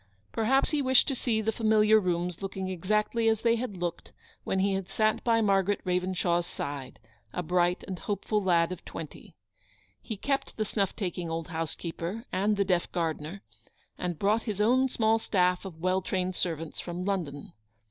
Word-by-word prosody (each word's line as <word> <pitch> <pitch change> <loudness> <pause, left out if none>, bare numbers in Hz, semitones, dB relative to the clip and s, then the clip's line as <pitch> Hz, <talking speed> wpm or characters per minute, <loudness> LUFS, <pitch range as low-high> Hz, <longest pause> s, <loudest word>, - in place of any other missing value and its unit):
Perhaps 265 +5 +2
he 300 -2 +2
wished 260 -1 +5
to - - 0
see 235 -3 0
the 220 +1 +1
familiar 220 -1 +4
rooms 180 -2 -1
looking 190 -1 -3
exactly 210 +5 +1
as 220 -1 +1
'they 230 -1 +4
had 230 -5 -4
looked 175 -1 -4 0.3
when 190 - -1
he 195 +1 +2
had 190 -1 -3
sat 215 +2 +1
by 230 -1 +3
Margaret 200 -1 +2
Ravenshaw's 180 -1 +1
side, 140 -2 -5 0.3
a 180 - -3
bright 175 +1 +1
and 185 -2 -5
hopeful 210 +1 -1
lad 175 -3 +3
of 185 - -6
twenty. 160 -3 -9 0.7
He 220 - -5
kept 275 +6 -2
the 215 - 0
snuff 200 -2 0
taking 180 -4 -3
old 165 0 -3
housekeeper 170 +5 -4
and 205 +2 +1
the 200 - +2
deaf 180 -2 +1
gardener, 165 +2 -3 0.5
and 175 -2 -3
brought 210 +6 +2
his 205 -2 -3
own 255 +5 +4
small 225 -2 +2
staff 180 -3 +1
of 180 -4 -7
well 185 +1 +2
trained 185 0 -1
servants 165 -3 -3
from 175 +1 -4
London. 170 -8 -3
190 Hz, 175 wpm, -29 LUFS, 175-215 Hz, 0.7 s, wished